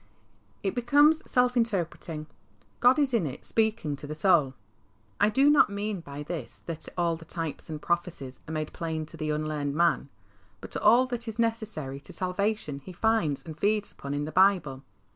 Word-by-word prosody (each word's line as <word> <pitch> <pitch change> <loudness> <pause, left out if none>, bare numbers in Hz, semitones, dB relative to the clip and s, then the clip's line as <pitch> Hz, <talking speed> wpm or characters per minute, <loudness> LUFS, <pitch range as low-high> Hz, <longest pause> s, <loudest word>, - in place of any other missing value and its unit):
It 195 - 0
becomes 290 +6 +4
self 250 0 +3
interpreting. 175 -8 -1 0.5
God 250 +3 +5
is 280 -4 +2
in 205 -10 +2
it 135 +1 -8
speaking 220 -9 0
to 145 - -9
the 150 - -5
soul. 155 -6 +3 0.6
I 205 - +5
do 270 +6 +4
not 295 -6 +6
mean 200 0 -3
by 145 -1 -7
this 165 +2 -6
that 165 -2 -6
all 170 -1 +1
the 165 - -11
types 165 -2 -5
and 155 -1 -4
prophecies 170 -6 -3
are - - -4
made 155 -1 -3
plain 160 -2 -3
to 155 - -4
the 155 -1 -3
unlearned 150 -2 -2
man, 170 -4 +2 0.5
but - - -10
all 235 +5 +5
that 245 -2 -5
is 220 -1 -4
necessary 220 - -1
to - - -13
salvation 185 -5 -1
he 185 - -9
finds 195 -7 +1
and 160 -2 -7
feeds 210 +2 +1
upon 140 +1 -5
in 145 0 -1
the 155 - -5
Bible. 180 -8 +3
175 Hz, 180 wpm, -28 LUFS, 155-220 Hz, 0.6 s, not